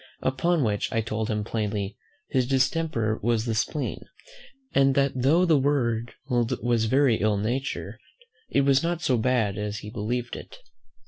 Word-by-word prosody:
Upon 160 +4 +1
which 105 -3 -1
I 115 - +1
told 110 0 -3
him 105 -1 -1
plainly, 105 -2 -2 0.3
"his 130 -2 +1
distemper 130 -4 +1
was 115 0 +1
the 115 - -1
spleen; 115 +7 -2 0.7
and 135 -1 +4
that 140 -1 +3
though 140 +8 +3
the 160 -5 +4
world 120 -5 0
was 120 -2 +1
very 130 0 +3
ill 105 -1 +1
natured, 125 +7 -3 0.5
it - - +3
was 135 0 +4
not 170 0 -2
so 130 - +2
bad 110 -4 +1
as 105 0 -3
he 105 - -8
believed 120 +2 -3
it." - - -10
120 Hz, 155 wpm, -26 LUFS, 110-140 Hz, 0.7 s, and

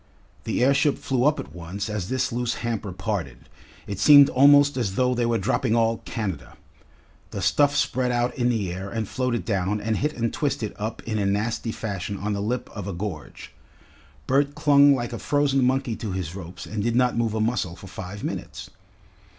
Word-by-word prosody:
The - - 0
airship 140 +2 +3
flew 130 -1 0
up 150 +1 +3
at - - -8
once 90 +4 -5
as 105 -4 -4
this 130 0 0
loose 120 0 -1
hamper 110 -4 -3
parted. 90 - -4 0.4
It 100 -2 -5
seemed 145 +4 +8
almost 145 +2 +6
as 110 -7 -2
though 125 +2 +2
they 120 -1 0
were 115 -1 +1
dropping 115 +3 0
all 115 0 +2
Canada. 95 - -5 0.7
The - - -6
stuff 145 +9 +3
spread 130 -3 +1
out 120 0 0
in 125 -1 +1
the 105 -7 -1
air 95 +2 -6
and 110 +1 -3
floated 125 -1 -2
down 100 -1 0
and 110 +1 -1
hit 150 +2 -1
and 115 -1 -1
twisted 130 -7 -2
up 110 +2 -4
in 110 -1 -2
a 100 - 0
nasty 110 +3 -1
fashion 100 -2 -4
on 105 +2 -2
the 100 - -2
lip 120 +4 -2
of 100 -2 -5
a 100 - -3
gorge. 85 -4 -7 0.7
Bert 140 +2 +1
clung 140 -1 +5
like 120 -1 -4
a 115 - -5
frozen 140 -2 +1
monkey 130 -2 +1
to 105 -4 -4
his 90 -3 -4
ropes 90 -2 -8
and 105 -1 -4
did 115 +2 0
not 125 0 +2
move 115 -2 0
a - - -1
muscle 110 -6 -1
for 90 - -13
five 95 +2 -8
minutes. - - -6
115 Hz, 200 wpm, -24 LUFS, 100-125 Hz, 0.7 s, seemed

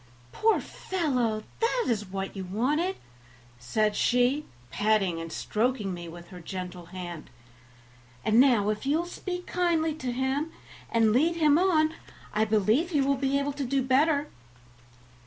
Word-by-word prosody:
"Poor 445 0 +2
fellow! 250 - -1 0.2
that 470 +1 +1
is 215 -4 0
what 195 +1 -5
you 190 - -4
wanted," 285 - 0 0.6
said 210 - 0
she, 250 +4 +2 0.3
patting 205 -5 +1
and 165 0 -7
stroking 215 -2 -1
me 175 -1 -7
with 170 +1 -11
her 180 - -10
gentle 180 0 -6
hand; 175 -3 -7 1.0
"and 220 +2 +4
now 240 -6 +5
if 215 0 -2
you 285 +3 +2
will 340 - -1
speak 360 0 -5
kindly 335 -3 +1
to 260 -5 -4
him 265 +5 -1 0.4
and 225 -2 +3
lead 320 +8 +3
him 305 -3 +4
on 320 -4 +3 0.4
I 215 +1 +2
believe 220 - +2
he 300 -5 +2
will 275 +1 +2
be 275 0 0
able 280 0 -1
to 285 0 -3
do 270 +1 0
better." 285 +3 +3
255 Hz, 155 wpm, -28 LUFS, 210-305 Hz, 1.0 s, now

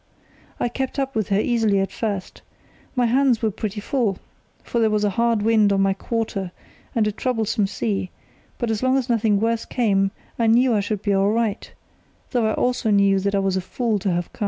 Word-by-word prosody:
I - - +1
kept 265 +3 -4
up 270 -1 -1
with 215 -3 -1
her 195 0 +2
easily 220 -3 +2
at 195 - -1
first. 205 -5 -4 0.5
My 250 -1 +2
hands 245 -1 +2
were 220 - +2
pretty 210 0 -4
full, 220 -4 -1 0.5
for 235 - -2
there 225 -1 +3
was 210 -1 +1
a 205 - +2
hard 230 +1 +1
wind 215 -2 +4
on 195 0 +2
my 195 0 +3
quarter 200 -3 -3 0.4
and 225 -2 +3
a 210 - +1
troublesome 220 -3 -1
sea; 200 -2 -2 0.5
but 240 -2 -1
as 215 - -2
long 260 +1 +3
as 260 -1 -2
nothing 220 -3 +2
worse 230 +1 0
came 195 -5 +1 0.3
I 230 - +2
knew 240 +2 +4
I 210 - +2
should 205 0 -3
be 205 - +1
all 195 +1 +3
right, 220 -1 -1 0.6
though 240 -4 +1
I 220 - 0
also 245 -2 0
knew 200 -1 +4
that 200 +1 -1
I - - +2
was 195 -1 0
a - - -1
fool 220 +3 -1
to 195 0 -1
have 175 0 -3
come. - - -19
220 Hz, 215 wpm, -22 LUFS, 200-235 Hz, 0.6 s, wind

